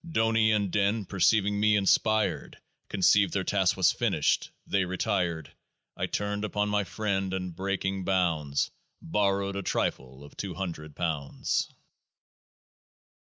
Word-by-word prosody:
DONI 115 -5 +3
and 100 -3 +1
DIN, 100 +1 +1
perceiving 100 +2 +2
me 105 0 +4
inspired, 100 -4 +1 0.3
Conceived 100 -1 +3
their 95 - 0
task 95 -1 +1
was - - +4
finished: - - 0 0.2
they 100 -1 +1
retired. 90 -4 -1 0.4
I - - -2
turned 105 0 -2
upon 105 -1 -1
my 105 -1 +1
friend, 95 -1 -2
and, 90 -2 -4
breaking 95 0 -2
bounds, 85 -7 0 0.3
Borrowed 100 +2 0
a 100 - -2
trifle 65 -7 -2
of 70 - -14
two 95 -3 -5
hundred 80 -6 -6
pounds. 80 -5 -2
95 Hz, 125 wpm, -28 LUFS, 90-105 Hz, 0.4 s, me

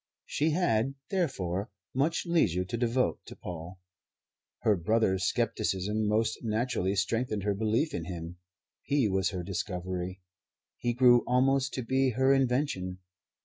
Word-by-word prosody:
She 155 +2 0
had, 135 -7 +1 0.2
therefore, 100 - -1 0.2
much 145 +6 +1
leisure 90 - +2
to 90 - -4
devote 120 +2 +1
to - - -9
Paul. 90 +1 -8 0.8
Her 105 - +4
brother's 95 0 +1
scepticism 105 +3 0
most 110 +2 +1
naturally 110 -4 0
strengthened 105 +1 0
her 105 0 +1
belief 110 +9 0
in 80 - -3
him. 85 -1 -6 0.4
He 140 -5 +1
was 95 -2 +1
her 90 -1 -4
discovery. 90 0 -4 0.6
He 120 - 0
grew 120 -1 +6
almost 135 +2 +2
to 130 - -2
be 130 +3 +2
her 130 +1 +5
invention. 125 -9 0
110 Hz, 135 wpm, -29 LUFS, 95-130 Hz, 0.8 s, grew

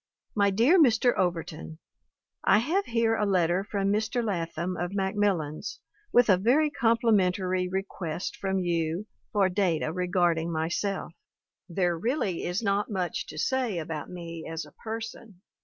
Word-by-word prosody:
"My 200 -1 +3
dear 245 - +5
Mr. 245 -3 +4
Overton: 165 - -2 0.3
" - - -25
T 200 - +7
HAVE 345 - 0
here 230 -1 +2
a 215 - 0
letter 180 -2 +2
from 200 -1 0
Mr. 220 +3 0
Latham 175 -2 -2
of 175 +3 -3
Mac 190 -1 0
millans 180 -8 -1 0.3
with 245 -1 +5
a 190 -4 +5
very 275 +10 +3
complimentary 195 -7 +2
request 185 -3 -4
from 195 -1 -1
you 170 +1 -1 0.3
for 200 -3 +3
data 180 -5 0
regarding 175 -2 +1
myself. 170 +4 -2 0.6
There 175 0 +1
really 220 - -1
is 180 +6 -2
not 200 0 +1
much 185 -5 -2
to 155 - -9
say 250 0 0
about 155 -2 -4
me 170 -2 -7
as 165 -1 -4
a 150 - -15
person. 225 -2 -7
190 Hz, 150 wpm, -28 LUFS, 170-220 Hz, 0.6 s, T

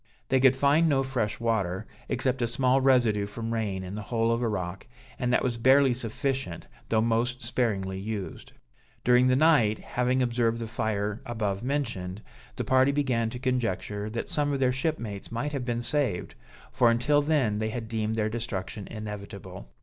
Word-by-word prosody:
They 135 - +4
could 130 0 +5
find 145 +5 +4
no 135 -2 +3
fresh 125 -6 -2
water, 105 -4 -1 0.2
except 130 0 0
a 120 - +2
small 130 +3 +2
residue 120 -6 +3
from 115 +2 -4
rain 100 -4 -2
in 95 +1 -7
the 105 - -4
hole 115 +2 0
of 115 +1 0
a 120 - +1
rock, 95 -2 -4 0.3
and 125 0 0
that - - +3
was 120 -2 -1
barely 130 +2 +5
sufficient 125 - -3 0.2
though 110 -1 +3
most 120 +3 0
sparingly 95 -6 -1
used. 105 -1 -6 0.5
During 125 +1 +5
the 130 - +4
night, 135 -8 +4
having 125 +1 0
observed 120 -1 +1
the 115 - -4
fire 110 -1 -2
above 110 -6 -2
mentioned, 115 -8 -3 0.3
the - - -2
party 130 +1 +4
began 130 -6 0
to 125 - -6
conjecture 115 -5 -2
that 115 +2 -4
some 145 -1 0
of 140 - -1
their 130 -1 +3
shipmates 125 -8 -3
might 125 +6 -2
have 135 -4 -3
been 120 -1 -2
saved, 130 - -1 0.4
for 120 - +4
until 120 +6 +3
then 140 -9 +1
they 110 0 -1
had 115 0 -5
deemed 110 -1 -1
their 110 -1 +1
destruction 110 -3 -4
inevitable. 100 -4 -8
115 Hz, 180 wpm, -27 LUFS, 105-130 Hz, 0.5 s, could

